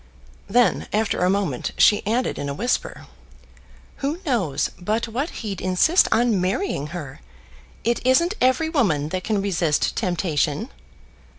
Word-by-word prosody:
Then, 245 -1 +2
after 215 0 0
a 180 - +3
moment, 190 -10 -1
she 210 -2 +5
added 240 +4 0
in 140 - -3
a 140 - -4
whisper, 240 - -2 0.9
"Who 290 +5 -2
knows 195 - 0
but 215 +6 -1
what 260 +8 -3 0.2
he'd 195 -4 -4
insist 185 - +3
on 225 -5 +2
marrying 185 - -1
her! 150 -4 -8 0.6
It 235 +2 0
isn't 300 +9 +3
every 260 +5 +3
woman 180 - +1
that 185 +2 -3
can 210 -3 -1
resist 165 -6 0
temptation." 175 - -1
210 Hz, 135 wpm, -22 LUFS, 175-245 Hz, 0.9 s, she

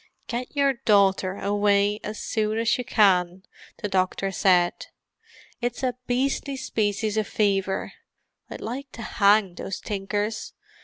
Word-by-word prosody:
"Get 245 +4 -5
your 280 -1 +3
daughter 200 -6 +2
away 205 0 +2
as 215 +1 -5
soon 215 0 -1
as 225 0 +2
you - - -1
can," 185 -5 +2 0.4
the - - +1
doctor 190 0 0
said. 180 -2 +2 0.7
"It's 245 +2 -3
a 255 -1 +1
beastly 270 +2 -1
species 215 -2 -1
of 215 - 0
fever; 195 -2 0 0.6
I'd - - -8
like 260 +4 -5
to 230 - -7
hang 200 -3 +3
those 195 - -5
tinkers. 205 +1 -3
210 Hz, 135 wpm, -25 LUFS, 195-230 Hz, 0.7 s, your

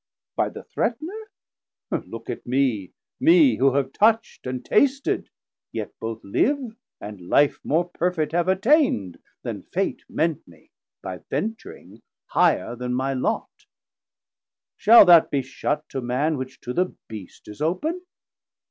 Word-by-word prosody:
By - - +1
the - - -10
Threatner, 350 - -3 0.6
look 115 0 -5
on - - -5
mee, 120 -7 0 0.3
Mee 315 0 +5
who 135 0 +3
have 140 -2 0
touch'd 225 - +1
and 125 -1 -4
tasted, 275 +3 +1 0.4
yet - - -5
both 115 0 -5
live, 250 - 0 0.2
And 100 -4 -9
life 145 0 +3
more 170 +4 +1
perfet 170 -3 -1
have 175 +1 +1
attaind 190 - +2 0.2
then - - -5
Fate - - -2
Meant 160 -2 -1
mee, 80 -3 -20 0.3
by 95 -1 -6
ventring 225 +1 -5 0.2
higher 120 - +2
then 125 0 -3
my 135 +2 0
Lot. 130 - -1 1.3
690 - - -30
Shall 230 -1 +9
that 170 -3 +7
be 140 -2 0
shut 150 +3 -3
to 135 - -4
Man, 130 +6 0
which 130 -1 -6
to 125 - -5
the 180 +4 0
Beast 105 -5 -10
Is 105 +6 -10
open? 245 - -1
150 Hz, 140 wpm, -24 LUFS, -, 1.3 s, Shall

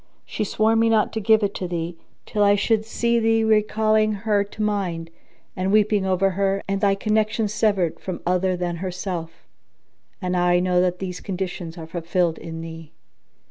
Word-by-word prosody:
She 215 - -3
swore 215 +2 +2
me 225 0 +3
not 220 -2 +2
to 220 - -1
give 220 +1 +4
it 200 0 0
thee, 175 -2 -3 0.3
till 210 -1 0
I 205 0 +5
should 215 +1 +1
see 235 +1 +1
thee 225 0 +2
recalling 215 0 +2
her 205 0 +1
to 205 +1 -9
mind 180 -6 -2 0.4
and 185 +1 -1
weeping 210 -2 +3
over 190 +1 +2
her 195 +1 0
and 195 0 -1
thy 200 -2 +3
connection 215 +1 0
severed 200 -5 0
from 185 - -5
other 185 +1 +1
than 175 -1 -2
herself; 180 -2 -5 0.7
and 180 -2 -3
now 180 -1 +2
I 175 0 +4
know 180 0 +2
that 180 0 +1
these 180 -1 -5
conditions 180 -3 -5
are 165 - -7
fulfilled 170 0 -1
in 165 0 -7
thee." 165 -1 -9
195 Hz, 180 wpm, -23 LUFS, 180-215 Hz, 0.7 s, I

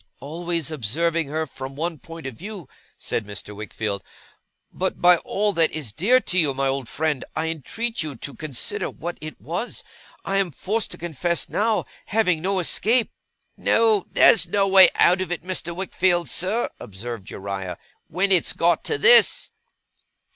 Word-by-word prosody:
'Always 165 +1 -3
observing 160 +5 0
her 160 +2 -2
from 135 -1 -8
one 165 +1 -3
point 165 0 -10
of 130 - -4
view,' 190 - -8 0.3
said 115 - -2
Mr. 105 0 -7
Wickfield; 105 -1 -4 0.7
'but 190 0 -2
by 175 0 +6
all 205 +4 -1
that 165 -2 +3
is 150 -9 -4
dear 220 - +4
to 185 -7 0
you, 145 -5 +2
my 135 0 0
old 135 -2 -2
friend, 150 -3 -1
I 160 +1 0
entreat 225 - -3
you 155 -3 -4
to 140 +4 -7
consider 150 -6 -3
what 175 +1 -6
it 155 0 -8
was; 175 +9 -4 0.4
I 195 - 0
am 195 -2 +1
forced 215 - -1
to - - -7
confess 170 +1 -2
now, 220 +1 +1 0.2
having 185 -7 +2
no 195 +2 0
escape 220 +6 +1 0.3
' - - -49
'No! 220 -4 +3
There's 190 -5 +5
no 195 +3 +2
way 190 -1 +8
out 180 +2 +4
of 185 - -3
it, 175 - -3
Mr. 180 -2 -3
Wickfield, 180 -1 +1
sir,' 205 +6 0
observed 105 +1 -7
Uriah, 95 -2 -5 0.3
'when 195 +4 0
it's 180 -3 +3
got 170 +1 +2
to 445 - +1
this. 485 +2 +5
170 Hz, 170 wpm, -23 LUFS, 140-190 Hz, 0.7 s, way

